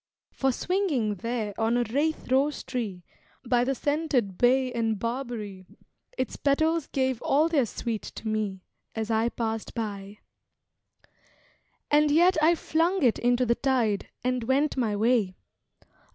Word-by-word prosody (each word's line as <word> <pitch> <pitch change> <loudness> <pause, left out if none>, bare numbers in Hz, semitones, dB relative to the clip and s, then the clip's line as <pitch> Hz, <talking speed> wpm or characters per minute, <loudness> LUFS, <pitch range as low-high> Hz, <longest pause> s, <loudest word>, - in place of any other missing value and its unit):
For 265 -1 +1
swinging 295 - 0
there 220 +1 -3
on 225 +2 +2
a 245 - +2
rathe 285 +4 -1
rose 280 +3 +2
tree, 210 -8 -4 0.4
By 245 0 +2
the 270 +2 0
scented 285 - 0
bay 255 +4 +3
and 225 -2 0
barberry, 230 -5 -5 0.5
Its - - -2
petals 315 +2 +1
gave 260 -3 -1
all 300 +4 +3
their 290 -8 +2
sweet 225 0 -4
to 220 - -6
me, 210 -4 -2 0.3
As 220 0 -2
I 225 +1 +2
passed 225 -1 -4
by. 205 -3 -5 1.7
And 300 0 +5
yet 345 +5 +5
I 330 +2 +5
flung 335 +3 0
it 240 -4 +3
into 245 +1 +2
the 235 - +3
tide, 235 -6 0 0.2
And 250 -2 -1
went 275 +4 +1
my 230 -6 0
way. 215 -3 +2
245 Hz, 140 wpm, -27 LUFS, 220-280 Hz, 1.7 s, And